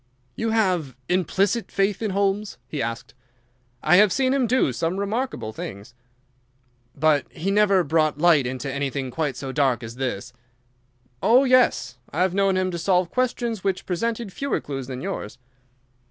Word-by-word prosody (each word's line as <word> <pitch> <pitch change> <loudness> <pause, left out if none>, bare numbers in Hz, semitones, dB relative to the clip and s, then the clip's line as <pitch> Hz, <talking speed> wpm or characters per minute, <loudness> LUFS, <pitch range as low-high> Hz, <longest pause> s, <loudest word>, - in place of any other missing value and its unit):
"You 225 - -1
have 185 - +1
implicit 190 +4 +1
faith 195 +1 0
in 220 - -1
Holmes?" 200 +1 -1
he 150 - -4
asked. 115 0 -4 0.7
"I 165 +4 +5
have 210 0 +6
seen 260 +4 +2
him 265 -3 +2
do 245 - +2
some 165 +7 -1
remarkable 200 - -3
things." 100 +1 -8 1.0
"But 150 -1 +2
he 190 +5 -2
never 200 -2 +4
brought 155 -1 +1
light 155 -5 +4
into 130 +1 -4
anything 140 -2 -3
quite 150 -4 -2
so 135 0 -5
dark 130 -3 +1
as 115 +1 -8
this?" 125 -2 -3 0.9
"Oh, 245 +4 +5
yes; 250 - +2
I 170 +5 0
have 185 -1 0
known 195 -1 +2
him 185 -1 0
solve 180 0 +1
questions 240 -4 -1
which 195 -1 -1
presented 225 +2 -2
fewer 280 0 -1
clues 135 -3 -6
than 130 -1 -6
yours." 180 - -5
180 Hz, 155 wpm, -24 LUFS, 140-210 Hz, 1.0 s, have